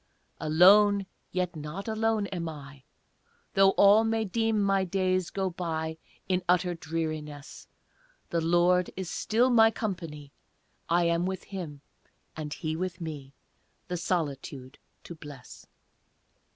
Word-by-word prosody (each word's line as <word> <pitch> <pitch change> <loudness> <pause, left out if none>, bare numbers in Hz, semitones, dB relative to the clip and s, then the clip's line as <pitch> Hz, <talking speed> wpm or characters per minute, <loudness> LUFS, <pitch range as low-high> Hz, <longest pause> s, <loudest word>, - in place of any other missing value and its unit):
Alone, 195 +5 +5 0.3
yet 180 -2 -2
not 155 +7 -6
alone 220 -1 0
am 170 -2 -3
I, 140 -3 -10 0.7
Though 195 0 +6
all 205 +2 +6
may 225 0 0
deem 225 +2 0
my 195 -1 +2
days 185 -1 0
go 190 -2 -2
by 160 -2 -4 0.3
In 185 -1 +1
utter 180 0 +3
dreariness; 155 -3 -5 0.6
The 170 - +1
Lord 175 +2 +3
is 190 -2 -4
still 240 +4 +2
my 225 -2 +6
company, 165 -10 -5 0.6
I 175 +1 +3
am 170 +1 +1
with 190 0 -4
Him, 165 -8 -7 0.5
and 155 -1 -5
He 155 +1 -3
with 180 +1 -4
me, 145 -5 -7 0.5
The 180 - -2
solitude 140 -6 -3 0.2
to - - -8
bless. 145 -5 -12
175 Hz, 125 wpm, -28 LUFS, 155-195 Hz, 0.7 s, Though